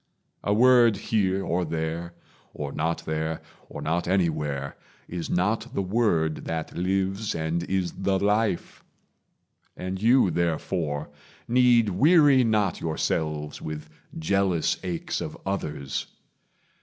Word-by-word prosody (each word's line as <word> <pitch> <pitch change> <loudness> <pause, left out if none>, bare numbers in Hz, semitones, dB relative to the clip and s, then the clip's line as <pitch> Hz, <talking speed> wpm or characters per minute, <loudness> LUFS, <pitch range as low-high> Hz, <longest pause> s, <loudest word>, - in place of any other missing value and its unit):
A - - 0
word 120 -1 +5
here, 95 -2 0
Or 90 +2 0
there, 80 +1 -3 0.4
or 70 -2 -4
not 80 +3 -2
there, 80 +1 -2 0.3
or - - -7
not 85 +3 -1
anywhere, 75 -7 0 0.3
Is 85 -1 -5
not 110 +7 0
the 100 - 0
Word 90 -6 +1
that 80 -1 -4
lives 95 +3 -1
and 80 +1 -1
is 95 -2 -1
the 95 0 0
life; 105 0 0 0.9
And 95 +1 -4
you, 115 -4 +5
therefore, 80 -3 -1 0.4
need 120 -2 +4
weary 145 - +5
not 105 -5 +1
yourselves 75 -1 -2
With 75 -1 -6 0.3
jealous 95 0 +1
aches 90 -3 -3
of - - -5
others. 75 -8 -3
90 Hz, 120 wpm, -26 LUFS, 80-105 Hz, 0.9 s, word